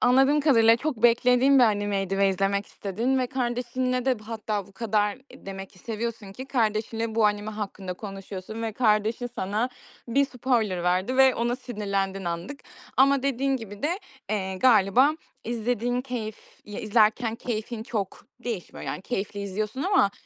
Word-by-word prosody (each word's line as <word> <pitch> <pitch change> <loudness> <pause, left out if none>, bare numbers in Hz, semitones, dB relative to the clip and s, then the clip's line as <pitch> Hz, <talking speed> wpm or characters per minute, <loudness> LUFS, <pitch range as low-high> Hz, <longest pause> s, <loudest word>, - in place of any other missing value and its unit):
anladığım 270 +4 +5
kadarıyla, 230 -6 +5
çok 245 -3 -3
beklediğin 250 +3 +5
bir 250 - +7
animeydi 205 -2 0
ve 195 0 +4
izlemek 195 +1 0
istedin 230 +7 -1
ve 255 - +1
kardeşinle 250 0 -1
de 260 -2 +2
hatta 215 -3 -3
bu 200 - -18
kadar 210 0 0 0.2
demek 195 0 -8
ki 185 - -20
seviyorsun 225 -2 -5
ki 255 +6 -7
kardeşinle 225 -2 -1
bu 220 -1 +4
anime 205 +1 -1
hakkında 200 -3 -5
konuşuyorsun 195 +2 -7
ve 225 -1 -2
kardeşin 220 +1 +1
sana 225 0 -2 0.4
bir 280 +4 +3
spoiler 235 -8 0
verdi 185 +8 +1
ve 265 -1 +6
ona 240 +1 0
sinirlendin 200 -6 -3
anlık. 170 +11 -4 0.4
Ama 275 0 +5
dediğin 275 0 +1
gibi 205 -4 -9
de, 335 +6 0 0.3
eee, 190 -3 -1
galiba 235 +4 +5 0.3
izlediğin 240 +1 -1
keyif 240 -5 -5 0.3
ile 210 +3 -7
izlerken 220 +1 +3
keyfin 225 -1 -4
çok 210 -4 -4 0.2
değişmiyor. 225 -8 -5
Yani, 185 - -4
keyifli 205 -3 -3
izliyorsun 210 +6 -3
ama, 375 - +3
225 Hz, 150 wpm, -26 LUFS, 200-250 Hz, 0.4 s, bir